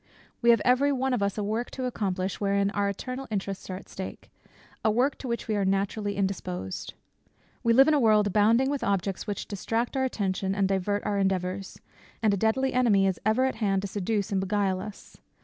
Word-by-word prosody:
We 235 - +3
have 230 -3 +5
every 255 +3 +4
one 265 -1 0
of 245 - 0
us 200 0 0
a 210 - -1
work 220 +4 -2
to 260 - -2
accomplish, 195 -6 -2
wherein 200 0 +1
our 200 -1 0
eternal 255 +6 -5
interests 195 -2 -4
are 185 - -3
at 185 - -10
stake; 190 - -8 0.5
a 220 - +3
work 250 +6 +2
to 265 - -6
which 235 -1 -3
we 215 - 0
are 200 - +1
naturally 200 +2 0
indisposed. 95 - -3 0.7
We 230 - +3
live 270 +3 +7
in 310 - +4
a 295 - +4
world 215 -4 +4
abounding 220 +6 +3
with 285 - -2
objects 195 -1 -1
which 205 - -3
distract 225 +5 -2
our 265 - +1
attention 195 -5 -1
and 200 -1 +2
divert 195 +1 -1
our 205 -1 0
endeavours; 190 0 -1 0.4
and 215 -2 +4
a - - +1
deadly 225 +6 +1
enemy 225 -6 +4
is 190 -2 0
ever 235 +4 +3
at 265 - -1
hand 195 -3 +1
to - - -2
seduce 205 +1 -2
and 195 -1 +1
beguile 195 -1 0
us. 210 0 -10
205 Hz, 210 wpm, -27 LUFS, 195-235 Hz, 0.7 s, live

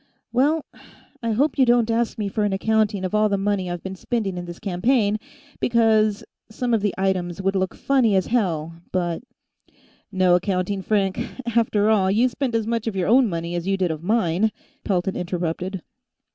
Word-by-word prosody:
"Well... 290 +5 +2 0.6
I 230 -1 -1
hope 280 +5 +1
you 260 - +6
don't 235 -1 +3
ask 230 0 0
me 210 -2 -2
for 210 +2 -1
an 205 -1 +1
accounting 215 -1 +1
of 185 - -4
all 215 0 +3
the 200 - +1
money 195 -2 -1
I've 175 -1 -5
been 190 0 -5
spending 205 -1 -2
in 175 0 -5
this 175 0 -8
campaign, 210 +3 +1 0.4
because 220 -3 +2 0.3
some 240 +2 -2
of 225 - +2
the 205 -2 -1
items 185 -2 -1
would 195 +1 0
look 190 -1 -1
funny 255 -7 +2
as 190 - +2
hell, 170 -9 0 0.2
but 175 -2 -1 0.5
" - - -32 0.3
"No 185 -2 +3
accounting, 185 +1 0
Frank. 195 -1 0 0.4
After 220 -2 +3
all, 195 -3 +3
you 225 +6 +3
spent 250 -1 -2
as 225 -1 +1
much 230 0 -2
of 220 - -2
your 185 -1 0
own 245 0 +5
money 170 -1 -3
as 175 +1 -3
you 195 0 +1
did 180 -3 0
of 155 -1 -5
mine," 205 0 +1 0.3
Pelton 190 -1 0
interrupted. 180 +1 -3
200 Hz, 190 wpm, -23 LUFS, 185-225 Hz, 0.6 s, you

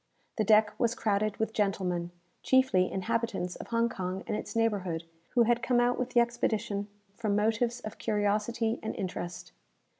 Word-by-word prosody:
The 215 - +2
deck 215 0 +5
was 235 -1 +2
crowded 210 -2 0
with 220 0 -1
gentlemen, 185 -5 0 0.3
chiefly 260 -9 +3
inhabitants 225 -2 -1
of - - -8
Hong 230 0 +2
Kong 185 -3 -4
and 215 - -2
its - - -5
neighbourhood, 195 -7 0 0.3
who 240 - +6
had 240 +1 +2
come 240 0 +2
out 245 0 +2
with 250 - -1
the 240 - +3
expedition 215 -3 -1 0.3
from 215 -2 0
motives 225 +3 +1
of 215 -1 -8
curiosity 215 +2 0
and 220 - -4
interest. 175 - -5
215 Hz, 160 wpm, -30 LUFS, 200-235 Hz, 0.3 s, who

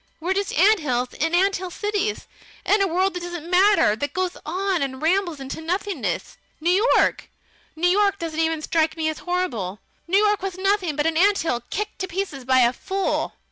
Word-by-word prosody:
We're 350 +4 -1
just 400 -4 -2
ants 300 - +2
in 325 +2 0
ant 390 +2 +3
hill 370 0 -6
cities, 415 +2 -2 0.4
in 415 0 +3
a 390 - +3
world 370 +3 +1
that 360 - -4
doesn't 345 -2 -6
matter; 375 - +4
that 285 +6 -4
goes 370 -1 -1
on 375 +2 -1
and 265 -1 -3
rambles 340 0 0
into 270 +3 -6
nothingness. 325 - -3 0.2
New 360 +8 +2
York - - +1 0.5
New 335 +3 +1
York 400 +2 +3
doesn't 325 -3 -4
even 320 -1 0
strike 320 0 0
me 315 -1 0
as 315 - -5
horrible. 240 - -2 0.3
New 375 +3 +3
York 415 -1 +3
was 380 -1 -4
nothing 385 -4 0
but 295 0 0
an 325 -1 +1
ant 400 +3 +4
hill 245 -7 -1
kicked 420 +1 -4
to 375 - -2
pieces 345 -8 -4
by 260 0 +4
a 240 0 +4
fool! 385 +6 -2
355 Hz, 195 wpm, -23 LUFS, 310-390 Hz, 0.5 s, matter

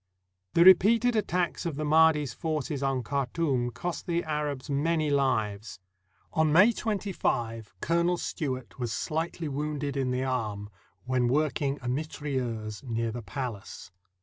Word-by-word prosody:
The 170 - +7
repeated 225 +6 +6
attacks 180 -5 0
of 165 -4 -3
the 155 +1 -3
Mahdi's 155 -2 +4
forces 155 -3 -3
on 135 -2 0
Khar 140 +1 -1
toum 135 -8 0
cost 170 +9 -5
the 170 0 0
Arabs 150 -3 -3
many 155 +2 +1
fives. 110 -8 0 0.5
On 160 -1 +3
May 185 +9 +7
25, 120 - -2
Colonel 170 +1 +2
Stewart 130 -6 -4
was 120 -2 -2
sfightly 160 +5 -2
wounded 145 0 -3
in 135 -2 0
the 125 +1 0
arm, 110 -6 -3 0.3
when 125 -1 +1
work 150 +4 +1
ing 140 0 0
a - - -4
mitrailleuse 125 -6 -3
near 115 -3 -2
the 120 +2 -5
palace. 110 -4 -6
140 Hz, 145 wpm, -28 LUFS, 125-160 Hz, 0.5 s, The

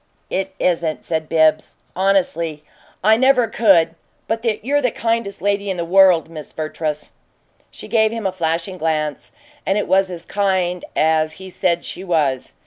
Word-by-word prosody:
"It 190 0 -2
isn't," 165 -3 0
said 160 -2 -3
BIBBS, 155 -1 +2 0.2
honestly. 170 -5 0 0.4
"I 220 +2 +5
never 255 -1 +4
could 180 -9 +3 0.3
but 225 +1 -2 0.2
you're 290 +2 +2
the 250 - +2
kindest 225 -4 -2
lady 200 0 0
in 190 - -2
this 170 - -2
world, 185 -2 +5
Miss 155 -3 -9
Vertrees." 155 -1 -4 0.6
She - - -11
gave 220 -1 +2
him 225 -2 -5
a 190 - +1
flashing 170 +1 -2
glance, 155 -2 -2 0.3
and 195 - 0
it 210 - -1
was 190 0 +3
as 175 -2 -8
kind 185 -3 0
as 155 0 +2
he 190 0 -10
said 175 -2 0
she 185 - -6
was. 150 -8 -1
180 Hz, 160 wpm, -19 LUFS, 160-200 Hz, 0.6 s, I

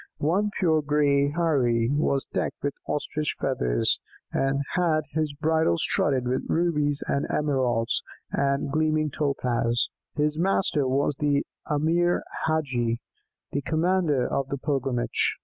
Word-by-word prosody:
One 190 +8 +1
pure 160 -4 +3
grey 145 -1 +2
Heirie 130 -8 +2
was 140 -2 +1
decked - - -3
with 140 -1 0
ostrich 150 +1 -2
feathers, 60 - +1 0.3
and 135 +1 +1
had 165 -4 +2
his 155 -1 0
bridle 160 - +2
studded 130 - +1
with 130 +1 -1
rubies 150 -4 +1
and 140 - 0
emeralds, 130 -6 +1 0.3
and 140 0 0
gleaming 155 -1 +1
topaz. 125 -5 0 0.3
His 150 +1 0
master 175 -6 +1
was 135 +2 +1
the 145 -2 +1 0.2
Emir 165 +4 +2 0.2
Hadgi, 125 -7 0 0.5
the 140 - -1
commander 160 -4 +1
of 135 -1 -1
the 140 - -3
pilgrimage. 135 -3 0
145 Hz, 125 wpm, -26 LUFS, 135-155 Hz, 0.5 s, pure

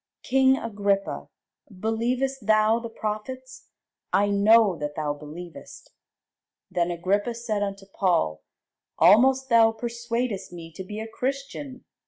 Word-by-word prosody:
King 265 0 +4
Agrippa, 200 -4 -1 0.5
believest 245 +3 -1
thou 215 +1 +4
the 230 0 -7
prophets? 255 +4 -6 0.4
I 205 +1 +3
know 205 0 +5
that 150 0 -4
thou 150 -2 -1
believest. 155 +4 -11 0.8
Then 175 0 0
Agrippa 195 +7 0
said 225 -3 -2
unto 195 -1 -4
Paul, 170 - 0 0.6
Almost 265 +4 +5
thou 230 -1 +6
persuadest 235 -2 -3
me 165 -2 -9
to 190 - -7
be 210 +3 -7
a 220 - -5
Christian. 275 +2 -5
215 Hz, 120 wpm, -25 LUFS, 195-240 Hz, 0.8 s, thou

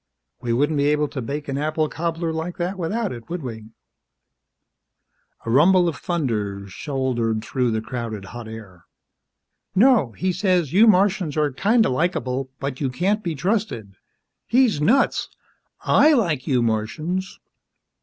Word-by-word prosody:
"We 120 -2 -2
wouldn't 145 +6 +1
be 140 0 +2
able 150 0 +2
to 130 - -5
bake 145 +5 -5
an 135 0 -2
apple 155 +1 0
cobbler 165 +1 -3
like 160 +3 -4
that 180 +2 -2
without 200 +4 -2
it, 115 -2 -9
would 175 -2 -4
we?" 110 -3 -7 1.8
A 115 - -2
rumble 175 +7 +5
of 165 - -1
thunder 110 - -2
shouldered 120 - -2
through 125 +1 0
the 110 -1 -1
crowded 110 -4 -5
hot 120 -2 -7
air. 105 -6 -11 0.9
"No. 215 - +4
He 185 0 -1
says, 180 -5 +1
you 215 +5 +6
Martians 190 -6 +3
are 150 -1 +2
kinda 220 - +2
likeable, 130 -3 -1
but 140 -1 -4
you 135 - 0
can't 195 - 0
be 170 -3 -2
trusted. 175 - -2 0.5
He's 235 - +3
nuts! 250 - +2 0.5
I 305 +2 +5
like 165 - 0
you 125 -4 +2
Martians!" 155 - -2
150 Hz, 145 wpm, -22 LUFS, 120-185 Hz, 1.8 s, you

